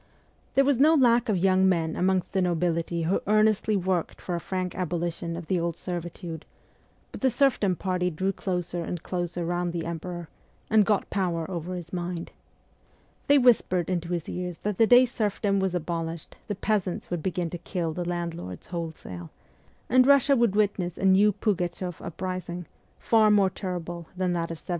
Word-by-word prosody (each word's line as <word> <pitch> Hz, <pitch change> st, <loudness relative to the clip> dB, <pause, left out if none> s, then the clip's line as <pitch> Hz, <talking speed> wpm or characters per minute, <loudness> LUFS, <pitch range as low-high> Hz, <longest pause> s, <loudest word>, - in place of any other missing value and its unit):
There 275 Hz, -, +5 dB
was 275 Hz, -3 st, +2 dB
no 310 Hz, +4 st, +6 dB
lack 240 Hz, -4 st, +4 dB
of 205 Hz, -, +2 dB
young 190 Hz, +1 st, +4 dB
men 165 Hz, -3 st, 0 dB
amongst 185 Hz, 0 st, 0 dB
the 190 Hz, -, +2 dB
nobility 170 Hz, -1 st, 0 dB
who 175 Hz, +4 st, +1 dB
earnestly 215 Hz, 0 st, +3 dB
worked 185 Hz, -2 st, -1 dB
for 180 Hz, -, -5 dB
a 170 Hz, -, -1 dB
frank 185 Hz, +1 st, -3 dB
abolition 170 Hz, -1 st, -3 dB
of 170 Hz, -, -7 dB
the 185 Hz, +1 st, 0 dB
old 170 Hz, -1 st, -2 dB
servitude; 175 Hz, -2 st, -6 dB, 0.7 s
but -, -, -9 dB
the 265 Hz, -, +4 dB
serfdom 240 Hz, -7 st, +2 dB
party 180 Hz, 0 st, -1 dB
drew 185 Hz, +4 st, -1 dB
closer 180 Hz, -3 st, -3 dB
and 170 Hz, 0 st, -5 dB
closer 175 Hz, -1 st, -3 dB
round 175 Hz, 0 st, -1 dB
the 170 Hz, -1 st, -3 dB
emperor, 170 Hz, +1 st, -5 dB, 0.4 s
and 215 Hz, -2 st, +5 dB
got 210 Hz, -2 st, +1 dB
power 175 Hz, -4 st, -1 dB
over 175 Hz, +1 st, -4 dB
his 175 Hz, -1 st, -8 dB
mind. 175 Hz, -1 st, -4 dB, 1.0 s
They 285 Hz, -, +6 dB
whispered 200 Hz, -, +3 dB
into 170 Hz, -2 st, -2 dB
his 170 Hz, -2 st, -2 dB
ears 180 Hz, -2 st, -4 dB
that 210 Hz, -2 st, -2 dB
the 225 Hz, -, +6 dB
day 245 Hz, +2 st, +7 dB
serfdom 205 Hz, -4 st, 0 dB
was 190 Hz, -2 st, 0 dB
abolished 165 Hz, -1 st, -4 dB
the 205 Hz, -, -2 dB
peasants 190 Hz, -4 st, -1 dB
would 175 Hz, -2 st, -1 dB
begin 175 Hz, -1 st, -2 dB
to 175 Hz, -, -5 dB
kill 170 Hz, -3 st, -3 dB
the 175 Hz, -, -3 dB
landlords 170 Hz, -, -5 dB
wholesale, 160 Hz, -, -6 dB, 0.6 s
and 255 Hz, +2 st, +5 dB
Russia 280 Hz, 0 st, +5 dB
would 235 Hz, -5 st, +2 dB
witness 195 Hz, -5 st, 0 dB
a -, -, -2 dB
new 195 Hz, +2 st, +6 dB
Pugachoff 180 Hz, -3 st, -2 dB
uprising, 175 Hz, 0 st, -5 dB, 0.3 s
far 220 Hz, -2 st, +4 dB
more 200 Hz, -2 st, +4 dB
terrible 175 Hz, -3 st, -5 dB
than 180 Hz, -1 st, 0 dB
that 170 Hz, -1 st, -2 dB
of 165 Hz, -, -5 dB
1773. -, -, -20 dB
180 Hz, 175 wpm, -26 LUFS, 170-200 Hz, 1.0 s, day